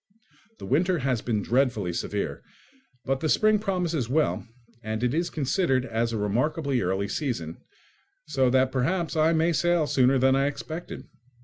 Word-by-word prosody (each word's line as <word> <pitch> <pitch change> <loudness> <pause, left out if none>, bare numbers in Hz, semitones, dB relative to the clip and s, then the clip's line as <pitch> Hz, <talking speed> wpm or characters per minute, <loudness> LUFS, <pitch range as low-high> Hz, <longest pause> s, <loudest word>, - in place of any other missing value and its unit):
The - - -9
winter 175 +6 +2
has 130 -5 -1
been 110 -5 -1
dreadfully 115 -8 +1
severe, - - -3 0.6
but 135 0 0
the 155 - -1
spring 215 +4 +3
promises 175 - -1
well, 150 -2 0 0.3
and 110 +1 -4
it 125 +1 +1
is 170 +2 0
considered 135 -3 0
as 115 -1 -1
a 115 - -2
remarkably 130 +6 0
early 95 +2 -1
season, 105 - -3 0.7
so 135 -4 +1
that 130 +1 +2
perhaps 165 +7 -1
I 160 +1 +3
may 165 +1 +2
sail 170 +1 +2
sooner 135 -1 +3
than 130 +1 +3
I 135 +1 +2
expected. 155 +4 -6
135 Hz, 155 wpm, -26 LUFS, 120-160 Hz, 0.7 s, spring